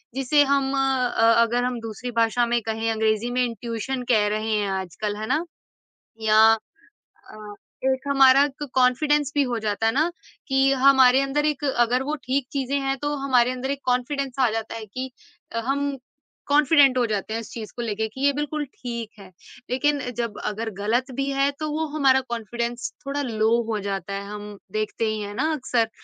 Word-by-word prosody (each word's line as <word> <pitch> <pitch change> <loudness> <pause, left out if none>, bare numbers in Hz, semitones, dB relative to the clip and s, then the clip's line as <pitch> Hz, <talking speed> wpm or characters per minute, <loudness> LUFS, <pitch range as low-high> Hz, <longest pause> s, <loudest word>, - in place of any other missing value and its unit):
जिसे 280 +2 +3
हम 270 -1 +1
अ, 255 -4 +2
अगर 240 +1 +1
हम 250 -1 -2
दूसरी 225 +2 -6
भाषा 235 +2 +2
में 235 0 0
कहें, 225 +1 -2
अंग्रेज़ी 220 +1 0
में 250 0 +1
इंट्यूशन 235 +3 -4
कह 210 -1 +3
रहे 215 +1 -1
हैं 205 -2 0
आजकल। 205 +3 -4
है 215 0 -5
ना? 320 - +1 0.8
या 215 0 +4 0.9
अ, 210 -1 -10 0.4
एक 260 - -1
हमारा 275 0 +6
तो 295 - -4
कॉन्फिडेंस 290 +3 +2
भी 285 - +4
हो 245 -3 -2
जाता 215 0 -1
है 225 - +4
ना, 315 +5 +1 0.4
कि 270 0 +3
हमारे 265 -1 +6
अंदर 285 +2 0
एक 295 -1 -1
अगर 250 -1 +2
वो 300 +3 -2
ठीक 260 0 -1
चीज़ें 275 0 -1
हैं, 270 0 -1
तो 290 +2 -2
हमारे 250 -2 +3
अंदर 260 +2 -3
एक 280 - -3
कॉन्फिडेंस 255 +1 -1
आ 250 -3 +4
जाता 225 0 -4
है 220 -1 -6
कि 255 +5 -6 0.4
अ, 230 - -1
हम 275 +3 -1 0.5
कॉन्फिडेंट 285 -2 +5
हो 245 - +3
जाते 215 0 -3
हैं, 225 - -1
इस - - -11
चीज़ 220 -2 -7
को 240 - -4
लेके 220 -1 -2
कि, 265 +5 -10
"ये 285 - +5
बिल्कुल 295 +1 -2
ठीक 235 -3 -5
है।" 190 -2 -12 0.4
लेकिन 290 +3 +1 0.2
जब 230 -3 -3
अगर 220 +2 -3
गलत 240 +6 0
भी 275 0 -1
है, 275 +1 +2
तो 310 0 -2
वो 315 +1 -1
हमारा 265 -3 +4
कॉन्फिडेंस 235 +1 -3
थोड़ा 280 +1 -2
लो 220 -4 0 0.2
हो 215 - -1
जाता 195 -1 -4
है। 200 0 -4
हम 210 0 -8
देखते 215 +1 -2
ही 215 0 -2
हैं 205 0 -6
ना 310 +6 0
अक्सर। 245 -5 0
250 Hz, 190 wpm, -24 LUFS, 220-275 Hz, 0.9 s, हमारा